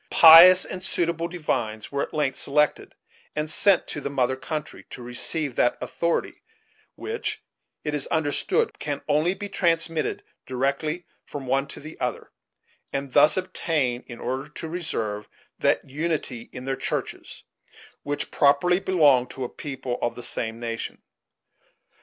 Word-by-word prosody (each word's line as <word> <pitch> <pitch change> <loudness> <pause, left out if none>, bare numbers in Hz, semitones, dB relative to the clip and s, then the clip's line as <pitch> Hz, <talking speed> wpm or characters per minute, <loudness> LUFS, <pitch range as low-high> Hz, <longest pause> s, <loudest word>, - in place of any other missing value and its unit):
Pious 170 +3 +9
and 185 - -7
suitable 170 -2 -1
divines 125 - -3
were 140 0 -1
at - - -3
length 145 -4 0
selected, 150 +1 +1 0.4
and 150 0 -1
sent 185 +4 +4
to 145 - -5
the - - -3
mother 130 -2 +1
country, 150 +2 -5
to 125 - -9
receive 125 +3 -2
that 120 - +2
authority 170 0 -2 0.5
which, 455 +1 -4 0.4
it 150 - -2
is 145 -2 -1
understood, 155 -3 0
can 145 -1 -3
only 155 +5 +2
be 205 - -5
transmitted 165 -4 0 0.2
directly 140 +6 -1 0.2
from 140 -2 -7
one 135 +2 0
to - - -8
the 155 +2 -10
other, 125 -1 -3 0.6
and 135 -1 -4
thus 150 +7 +5
obtain, 155 -9 -1
in 120 -2 -9
order 135 +3 -4
to 155 +2 -7
reserve, 115 -12 -4 0.3
that - - +2
unity 145 -5 -3
in 125 0 -8
their 135 0 -1
churches - - -4 0.6
which 145 0 -3
properly 145 +6 +3
belonged 145 -10 +3
to 130 - -6
a 120 - -3
people 135 -4 -5
of 120 - -1
the 120 - -8
same 115 -1 -3
nation. 115 -1 -5
145 Hz, 145 wpm, -25 LUFS, 130-165 Hz, 0.6 s, Pious